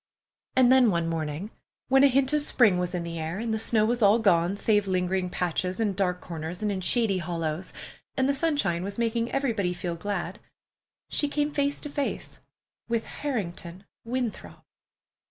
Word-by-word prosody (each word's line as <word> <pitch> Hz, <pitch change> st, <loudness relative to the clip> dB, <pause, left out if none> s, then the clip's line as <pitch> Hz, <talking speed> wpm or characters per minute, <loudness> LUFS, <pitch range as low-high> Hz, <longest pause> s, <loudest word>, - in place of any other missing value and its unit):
And 255 Hz, -1 st, +5 dB
then, 260 Hz, -3 st, +6 dB
one 170 Hz, -3 st, 0 dB
morning 165 Hz, +4 st, -3 dB, 0.4 s
when 270 Hz, +1 st, +5 dB
a -, -, +9 dB
hint 270 Hz, +1 st, +2 dB
of 300 Hz, -, +3 dB
spring 220 Hz, -10 st, +3 dB
was 180 Hz, 0 st, -2 dB
in 175 Hz, -, -2 dB
the 170 Hz, -1 st, -5 dB
air, 160 Hz, +3 st, -3 dB
and 225 Hz, +1 st, -2 dB
the 220 Hz, -, 0 dB
snow 220 Hz, -1 st, +4 dB
was 240 Hz, +2 st, 0 dB
all 205 Hz, +1 st, +6 dB
gone 190 Hz, -3 st, +2 dB
save 205 Hz, -1 st, +2 dB
lingering 185 Hz, 0 st, 0 dB
patches 180 Hz, +2 st, -2 dB
in 215 Hz, -3 st, +1 dB
dark 180 Hz, -1 st, -1 dB
corners 165 Hz, +3 st, -6 dB
and 210 Hz, -, +1 dB
in 190 Hz, -2 st, -3 dB
shady 205 Hz, -1 st, +2 dB
hollows, 165 Hz, 0 st, -3 dB, 0.5 s
and 260 Hz, 0 st, +2 dB
the 280 Hz, -, +2 dB
sunshine 280 Hz, -, +1 dB
was 200 Hz, +1 st, -5 dB
making 230 Hz, 0 st, 0 dB
everybody 225 Hz, -10 st, 0 dB
feel 175 Hz, -1 st, -4 dB
glad, 185 Hz, 0 st, -4 dB, 0.7 s
she 290 Hz, -, 0 dB
came 295 Hz, +1 st, -1 dB
face 285 Hz, 0 st, 0 dB
to 295 Hz, -, -5 dB
face 285 Hz, -1 st, -3 dB, 0.5 s
with 230 Hz, -1 st, 0 dB
Harrington 190 Hz, -9 st, -4 dB, 0.2 s
Winthrop! 240 Hz, -1 st, -4 dB
200 Hz, 175 wpm, -27 LUFS, 180-245 Hz, 0.7 s, a